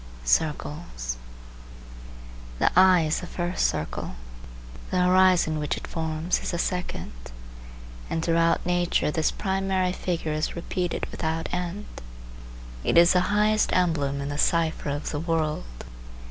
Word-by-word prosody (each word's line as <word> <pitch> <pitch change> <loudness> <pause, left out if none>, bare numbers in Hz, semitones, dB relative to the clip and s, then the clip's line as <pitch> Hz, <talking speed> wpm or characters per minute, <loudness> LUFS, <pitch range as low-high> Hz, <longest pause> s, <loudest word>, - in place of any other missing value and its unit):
CIRCLES 145 - -1 1.4
The - - +3
eye 185 -1 +7
is 155 0 0
the 180 - -7
first 175 +1 0
circle; 75 -5 -4 0.7
the 180 -1 +2
horizon 180 -4 +4
which 150 -1 -1
it - - -7
forms 160 +1 -1
is - - -4
the 170 - -2
second; 180 +1 -3 1.0
and 165 0 -2
throughout 165 0 +2
nature 175 -3 +1
this 160 0 +1
primary 190 -1 0
figure 170 -4 -2
is 155 0 -2
repeated 175 +1 -2
without 160 +1 -3
end. 180 +3 -3 1.0
It - - +2
is 170 +1 +7
the 180 - +4
highest 210 +1 +2
emblem 145 -6 +1
in 140 - -4
the 145 0 -4
cipher 165 -2 +1
of 145 +1 -3
the 145 - -2
world. 155 - -2
170 Hz, 130 wpm, -26 LUFS, 155-180 Hz, 1.4 s, eye